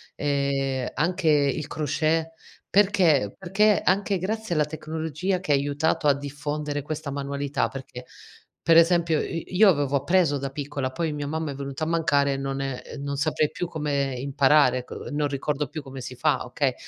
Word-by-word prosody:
e 140 Hz, -2 st, -1 dB
anche 165 Hz, +2 st, 0 dB
il 145 Hz, 0 st, +2 dB
crochet. 155 Hz, +2 st, 0 dB, 0.4 s
Perché? 185 Hz, -, +3 dB
Perché 200 Hz, +3 st, +3 dB
anche 195 Hz, +1 st, +2 dB
grazie 220 Hz, +1 st, -2 dB
alla 150 Hz, -2 st, +2 dB
tecnologia 160 Hz, +4 st, -3 dB
che 155 Hz, -6 st, 0 dB
ha -, -, +6 dB
aiutato 145 Hz, +2 st, 0 dB
a 140 Hz, -, +6 dB
diffondere 145 Hz, +1 st, -4 dB
questa 155 Hz, -1 st, -5 dB
manualità, 140 Hz, -2 st, -2 dB
perché 125 Hz, -1 st, -9 dB, 0.6 s
per 165 Hz, 0 st, +5 dB
esempio 165 Hz, -2 st, +4 dB
i 170 Hz, +2 st, -5 dB
io 210 Hz, +1 st, +7 dB
avevo 145 Hz, -4 st, +1 dB
appreso 160 Hz, 0 st, +2 dB
da 135 Hz, 0 st, -4 dB
piccola, 140 Hz, -2 st, -4 dB
poi 160 Hz, +3 st, -2 dB
mia 145 Hz, -1 st, -4 dB
mamma 155 Hz, +1 st, -3 dB
è -, -, -7 dB
venuta 140 Hz, +2 st, -4 dB
a -, -, -4 dB
mancare 140 Hz, -4 st, +2 dB
e -, -, -2 dB
non 135 Hz, 0 st, -3 dB
è 135 Hz, -2 st, -4 dB
e -, -, -9 dB
non 140 Hz, 0 st, -4 dB
saprei 150 Hz, 0 st, +1 dB
più 175 Hz, -, -4 dB
come 145 Hz, -4 st, -1 dB
imparare, 140 Hz, -1 st, +3 dB
co -, -, -9 dB
non 145 Hz, 0 st, 0 dB
ricordo 145 Hz, +1 st, -2 dB
più 155 Hz, +3 st, -6 dB
come 135 Hz, -1 st, -9 dB
si 125 Hz, -, -7 dB
fa, 150 Hz, 0 st, +1 dB
okay. 130 Hz, +1 st, 0 dB
145 Hz, 180 wpm, -25 LUFS, 140-160 Hz, 0.6 s, io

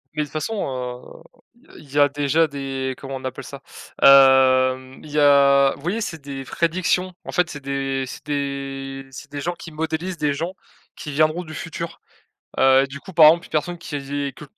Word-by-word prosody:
Mais 150 Hz, -, 0 dB
de -, -, -7 dB
toute -, -, -21 dB
façon, 155 Hz, +9 st, -3 dB, 1.1 s
heu, -, -, -19 dB
i -, -, -14 dB
il 140 Hz, -, -18 dB
y 145 Hz, -, +2 dB
a 145 Hz, 0 st, +6 dB
déjà 145 Hz, +3 st, +1 dB
des 135 Hz, -2 st, -4 dB
comment 135 Hz, -1 st, -7 dB
on 130 Hz, -, -12 dB
appelle 130 Hz, -, -5 dB
ça? -, -, -10 dB, 0.4 s
Hem, 130 Hz, -1 st, +5 dB
il 150 Hz, -, -11 dB
y 150 Hz, -, +1 dB
a 140 Hz, -1 st, +5 dB
vous -, -, -16 dB
voyez 190 Hz, +8 st, -2 dB
c'est 165 Hz, -6 st, -4 dB
des 135 Hz, -1 st, -7 dB
prédictions, 180 Hz, +4 st, 0 dB
en -, -, -6 dB
fait 180 Hz, -2 st, +1 dB
c'est 145 Hz, -, -7 dB
des 135 Hz, -1 st, -2 dB
c'est -, -, -10 dB
des 135 Hz, -2 st, -4 dB
c'est 140 Hz, +2 st, -11 dB
des 145 Hz, -, -5 dB
gens 175 Hz, +4 st, -2 dB
qui 165 Hz, -1 st, -11 dB
modélisent 160 Hz, +3 st, -3 dB
des 150 Hz, -2 st, 0 dB
gens, 165 Hz, +6 st, -4 dB, 0.4 s
qui 150 Hz, -, -7 dB
viendront 155 Hz, +4 st, +1 dB
du 155 Hz, -1 st, -10 dB
futur. 170 Hz, +2 st, -6 dB, 0.6 s
Heu, 135 Hz, +1 st, +5 dB
du 140 Hz, +1 st, -8 dB
coup 190 Hz, -, -12 dB
par 160 Hz, -2 st, +8 dB
exemple 170 Hz, +3 st, +5 dB
une -, -, -22 dB
personne 165 Hz, +3 st, -2 dB
qui 165 Hz, -, -8 dB
est 140 Hz, 0 st, -4 dB
que -, -, -10 dB
145 Hz, 210 wpm, -22 LUFS, 135-160 Hz, 1.1 s, par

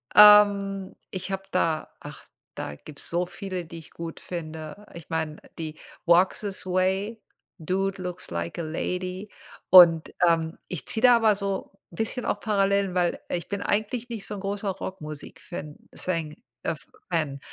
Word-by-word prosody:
Ähm, 200 Hz, -2 st, +7 dB
ich 190 Hz, +1 st, -5 dB
habe 195 Hz, 0 st, -2 dB
da 165 Hz, -4 st, +1 dB
ach, -, -, -11 dB, 0.3 s
da 75 Hz, -, -5 dB
gibt's 145 Hz, -, -11 dB
so 175 Hz, +1 st, 0 dB
viele, 185 Hz, -1 st, -5 dB
die 165 Hz, +1 st, -9 dB
ich 160 Hz, -, -15 dB
gut 165 Hz, -1 st, -7 dB
finde, 160 Hz, +2 st, -7 dB
ich 170 Hz, -3 st, -11 dB
meine, 160 Hz, -1 st, -2 dB, 0.2 s
die 155 Hz, -1 st, -5 dB, 0.3 s
„Walk 175 Hz, +2 st, +5 dB
this 200 Hz, -3 st, -4 dB
Way“, 190 Hz, +4 st, 0 dB, 0.4 s
„Dude 190 Hz, +3 st, -1 dB
looks 180 Hz, 0 st, -5 dB
like 85 Hz, -, -3 dB
a -, -, 0 dB
Lady“, 180 Hz, +5 st, -3 dB, 0.4 s
und, 170 Hz, -3 st, +8 dB
ähm, 165 Hz, -1 st, +1 dB
ich 170 Hz, -8 st, -5 dB
ziehe 220 Hz, -, +1 dB
da 245 Hz, -1 st, +8 dB
aber 220 Hz, -3 st, +4 dB
so 200 Hz, -1 st, -3 dB, 0.2 s
bisschen 225 Hz, +6 st, -2 dB
auch -, -, 0 dB
Parallelen, 200 Hz, -3 st, +1 dB
weil 175 Hz, -1 st, +1 dB
ich 175 Hz, -, -2 dB
bin 200 Hz, 0 st, -2 dB
eigentlich 225 Hz, +4 st, -1 dB
nicht 225 Hz, -4 st, -5 dB
so -, -, -5 dB
'n -, -, -6 dB
großer 200 Hz, +1 st, -2 dB
Rockmusik-Fan 155 Hz, -5 st, -7 dB
es -, -, -8 dB
sein 165 Hz, -4 st, -1 dB, 0.3 s
ef -, -, -3 dB, 0.3 s
Fan, 145 Hz, -4 st, 0 dB
185 Hz, 160 wpm, -26 LUFS, 165-200 Hz, 0.4 s, und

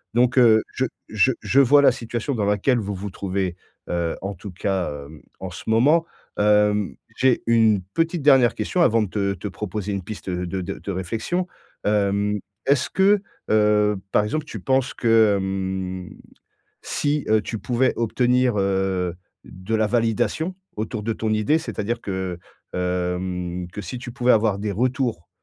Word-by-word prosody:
Donc, 120 Hz, +1 st, +3 dB
heu, 110 Hz, -3 st, +6 dB
je 130 Hz, -, 0 dB, 0.2 s
je 110 Hz, +4 st, +3 dB
je 135 Hz, -, +2 dB
vois 145 Hz, +2 st, +5 dB
la -, -, +7 dB
situation 120 Hz, +3 st, -4 dB
dans 110 Hz, -5 st, -1 dB
laquelle 105 Hz, +5 st, +2 dB
vous 100 Hz, -2 st, -4 dB
vous 100 Hz, +1 st, -6 dB
trouvez, 95 Hz, -2 st, -2 dB, 0.3 s
heu, 85 Hz, -1 st, -1 dB
en 100 Hz, +1 st, -3 dB
tout 100 Hz, +2 st, -9 dB
cas, 95 Hz, 0 st, -1 dB, 0.2 s
hem, 75 Hz, +2 st, -13 dB, 0.2 s
en 95 Hz, -1 st, -6 dB
ce 85 Hz, -, -8 dB
moment, 140 Hz, +9 st, +4 dB, 0.4 s
hem, 105 Hz, -5 st, +3 dB, 0.2 s
j'ai 130 Hz, -1 st, +2 dB
une 110 Hz, -3 st, +4 dB
petite 165 Hz, -1 st, 0 dB
dernière 135 Hz, -4 st, +5 dB
question 180 Hz, -, -1 dB
avant 115 Hz, -8 st, +4 dB
de -, -, -2 dB
te 100 Hz, 0 st, -1 dB
te 90 Hz, +3 st, -6 dB
proposer 105 Hz, +1 st, -4 dB
une 100 Hz, -2 st, -3 dB
piste 100 Hz, -1 st, -6 dB
de 90 Hz, +1 st, -3 dB
de 95 Hz, +2 st, -5 dB
de 100 Hz, -, -5 dB
réflexion, 115 Hz, -, -2 dB, 0.4 s
hem, 105 Hz, 0 st, +1 dB, 0.3 s
est-ce 140 Hz, -1 st, +2 dB
que, 195 Hz, +1 st, +3 dB, 0.3 s
heu, 105 Hz, -1 st, +3 dB
par 105 Hz, -, +3 dB
exemple 155 Hz, +9 st, -2 dB
tu -, -, -7 dB
penses 130 Hz, -1 st, +1 dB
que 110 Hz, -3 st, +4 dB
hem 95 Hz, -1 st, -3 dB, 0.7 s
si, 145 Hz, 0 st, -1 dB
heu, 110 Hz, 0 st, +4 dB
tu 110 Hz, +1 st, -5 dB
pouvais 125 Hz, +3 st, +1 dB
obtenir, 125 Hz, +1 st, +2 dB
heu, 95 Hz, -2 st, 0 dB, 0.3 s
de 95 Hz, +5 st, -4 dB
la 110 Hz, -1 st, +2 dB
validation 120 Hz, -, 0 dB, 0.2 s
autour 110 Hz, 0 st, -3 dB
de 115 Hz, -, -1 dB
ton 110 Hz, 0 st, -3 dB
idée, 110 Hz, +9 st, +2 dB
c'est-à-dire 115 Hz, -6 st, -3 dB
que, 95 Hz, -3 st, -4 dB, 0.3 s
hem, 90 Hz, 0 st, -2 dB
que 105 Hz, -, -6 dB
si 100 Hz, +7 st, -6 dB
tu 125 Hz, 0 st, -7 dB
pouvais 125 Hz, 0 st, +2 dB
avoir 110 Hz, -3 st, +3 dB
des 105 Hz, 0 st, -2 dB
retours, 120 Hz, -, -1 dB
105 Hz, 170 wpm, -23 LUFS, 95-120 Hz, 0.7 s, la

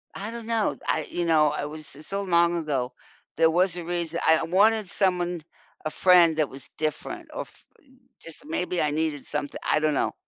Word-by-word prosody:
I 205 Hz, +3 st, -5 dB
don't 235 Hz, -1 st, -7 dB
know. 225 Hz, -2 st, 0 dB
I 155 Hz, -, +1 dB
you 175 Hz, -, -2 dB
know, 155 Hz, -2 st, +4 dB
I 145 Hz, 0 st, -3 dB
was 150 Hz, -1 st, -5 dB
it's 150 Hz, +2 st, -11 dB
so 195 Hz, 0 st, -2 dB
long 170 Hz, -2 st, +3 dB
ago. 135 Hz, -6 st, -2 dB, 0.4 s
There 160 Hz, 0 st, +4 dB
was 180 Hz, +1 st, +3 dB
a 175 Hz, -, -5 dB
reason, 170 Hz, -1 st, -1 dB
I 160 Hz, 0 st, +5 dB
wanted 205 Hz, +3 st, +3 dB
someone 180 Hz, -3 st, +1 dB, 0.4 s
a -, -, 0 dB
friend 175 Hz, -3 st, +5 dB
that 155 Hz, -3 st, +1 dB
was 135 Hz, -1 st, -3 dB
different 320 Hz, -, -4 dB
or -, -, -3 dB
f -, -, -13 dB, 0.5 s
just, 165 Hz, -, -7 dB
maybe 180 Hz, -, -2 dB
I 150 Hz, -, +1 dB
needed 150 Hz, -2 st, -1 dB
something 145 Hz, -1 st, -4 dB
I -, -, +2 dB
don't 155 Hz, 0 st, +1 dB
know. -, -, 0 dB
170 Hz, 200 wpm, -25 LUFS, 155-185 Hz, 0.5 s, I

